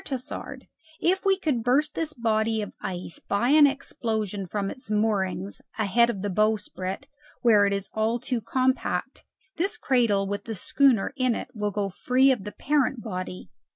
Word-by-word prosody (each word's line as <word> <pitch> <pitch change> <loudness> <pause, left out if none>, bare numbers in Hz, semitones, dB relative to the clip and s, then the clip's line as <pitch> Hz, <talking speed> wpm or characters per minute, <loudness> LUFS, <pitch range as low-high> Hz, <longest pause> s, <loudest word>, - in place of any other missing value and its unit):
Tassard, 260 -3 -6 0.3
if 380 +3 +1
we 385 -1 +4
could 295 -10 0
burst 280 +6 +2
this 320 -2 -2
body 220 -2 0
of 205 - -8
ice 180 -2 -5
by 205 +5 0
an 295 0 +7
explosion 220 -8 -2
from 200 +1 -2
its 255 -4 -9
moorings 200 -3 -1 0.2
ahead 225 +2 +3
of 200 -5 -3
the 205 - -1
bowsprit, 210 +1 -1 0.4
where 210 -4 +6
it - - 0
is 200 0 -2
all 220 +2 +1
too 245 0 -3
compact, 260 +4 -1 0.3
this 380 +5 -1
cradle 230 -7 +2
with 200 +1 -4
the 225 - -4
schooner 250 +2 +2
in 255 -3 +2
it - - -5
will 210 -3 -1
go 205 0 -1
free 255 +7 +3
of 225 -7 -1
the 210 - -5
parent 270 -3 0
body." 185 -4 -6
225 Hz, 170 wpm, -26 LUFS, 200-260 Hz, 0.4 s, an